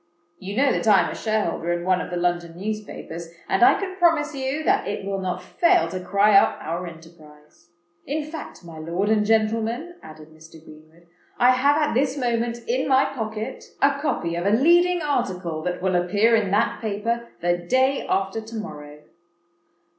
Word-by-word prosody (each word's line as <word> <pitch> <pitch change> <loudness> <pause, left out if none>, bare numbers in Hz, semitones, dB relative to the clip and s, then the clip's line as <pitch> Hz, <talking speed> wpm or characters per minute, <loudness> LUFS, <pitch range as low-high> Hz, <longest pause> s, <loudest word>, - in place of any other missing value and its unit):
You 200 +3 -6
know 275 0 +4
that - - -1
I 205 -2 +6
am - - -2
a - - -6
shareholder 210 -6 -1
in 175 0 -2
one 185 -1 +2
of - - -6
the 180 - -3
London 175 -1 -1
newspapers; 195 -5 -6 0.2
and 190 - 0
I 240 - +6
can 375 -2 -5
promise 325 -4 +2
you 270 +3 -3
that - - +1
it 200 -1 -4
will 195 0 -2
not 185 -1 -3
fail 355 +1 +2
to 185 - -4
cry 200 +3 +3
up 195 - +5
our 170 +3 -4
enterprise. 160 -1 -16 0.4
In 300 +2 -2
fact, 305 - -9
my 165 -2 -10
lord 170 +6 -2
and 215 -1 +3
gentlemen," 225 +9 0
added 155 0 -13
Mr. 160 +1 -17
Greenwood, 160 +1 -16 0.3
"I 250 +1 +5
have 280 +3 +3
at 300 -1 +1
this 270 +2 +1
moment 235 -2 -2
in 255 +3 0
my 270 0 +4
pocket 220 -5 -5
a 275 0 +2
copy 170 - -1
of 175 +3 -2
a 210 +2 +4
leading 345 +4 +4
article—that 180 - -2
will 190 -1 +1
appear 205 +6 +3
in 215 -4 +1
that 205 +4 +1
paper, 230 +2 -2
the 175 0 +1
day 260 +10 +1
after 195 +3 -1
to 225 +1 -10
morrow." 150 -8 -8
210 Hz, 185 wpm, -23 LUFS, 175-260 Hz, 0.4 s, I